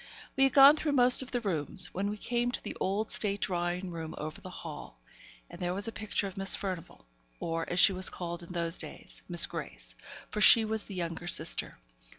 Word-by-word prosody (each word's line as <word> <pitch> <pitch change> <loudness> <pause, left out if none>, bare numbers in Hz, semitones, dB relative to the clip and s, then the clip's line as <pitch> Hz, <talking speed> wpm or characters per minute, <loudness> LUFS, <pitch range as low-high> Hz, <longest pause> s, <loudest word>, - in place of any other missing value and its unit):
We 270 - +4
had 270 - 0
gone 280 +2 +8
through 300 -1 -2
most 250 -1 +4
of 260 - -7
the 245 - -3
rooms, 180 -3 +2
when 200 +2 -2
we 210 - -5
came 240 +3 -1
to - - -4
the - - -5
old 205 +3 -2
state 200 -1 0
drawing 175 0 -2
room 165 -1 -7
over 155 0 -7
the 185 - -9
hall, 165 - -10 0.5
and - - -13
there 180 0 -2
was 200 +3 -1
a - - -3
picture 215 -1 -3
of 195 0 -8
Miss 195 0 +3
Furnivall; 180 - -7 0.3
or, 165 0 -4
as 175 - -2
she 190 - +6
was 185 0 +2
called 175 -1 -6
in 170 - -11
those 170 -1 -2
days, - - -7
Miss - - +7
Grace, - - -6 0.4
for 210 - -3
she 225 +1 +7
was 220 0 -3
the 200 - -8
younger 170 -1 -5
sister. - - +2
185 Hz, 215 wpm, -29 LUFS, 170-215 Hz, 0.5 s, gone